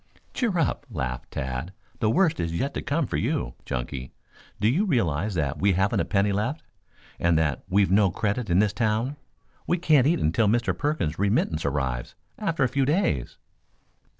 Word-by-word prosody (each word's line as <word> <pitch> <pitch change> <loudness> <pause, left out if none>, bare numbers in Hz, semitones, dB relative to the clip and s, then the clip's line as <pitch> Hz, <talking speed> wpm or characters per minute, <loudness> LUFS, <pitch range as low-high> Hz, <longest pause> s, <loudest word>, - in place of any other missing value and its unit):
"Cheer 230 -8 0
up," 145 -2 0
laughed 65 - -4
Tad. 65 +6 -4 0.3
"The 110 - +2
worst 165 - +2
is 85 0 -1
yet 140 +7 -1
to - - -3
come 145 +1 0
for - - -2
you, - - -1
Chunky. 65 +1 -4 0.5
Do 105 - +2
you 150 - +3
realize 105 - 0
that 75 -2 -1
we 100 +2 +3
haven't 95 +2 +1
a - - +1
penny 100 0 +1
left, 110 +10 -2 0.6
and 85 -1 +3
that 75 -3 0
we've 100 0 +3
no 100 0 +5
credit 105 +4 -2
in 85 - +3
this 105 0 +3
town? 115 +4 0 0.5
We 175 - +2
can't 155 -6 +4
eat 170 - +3
until 85 +8 +2
Mr. 120 +3 +1
Perkins' 145 - -1
remittance 100 - +1
arrives 65 -4 -2 0.2
after 165 -8 0
a - - +4
few 135 +2 0
days." 145 - 0
105 Hz, 180 wpm, -26 LUFS, -, 0.6 s, no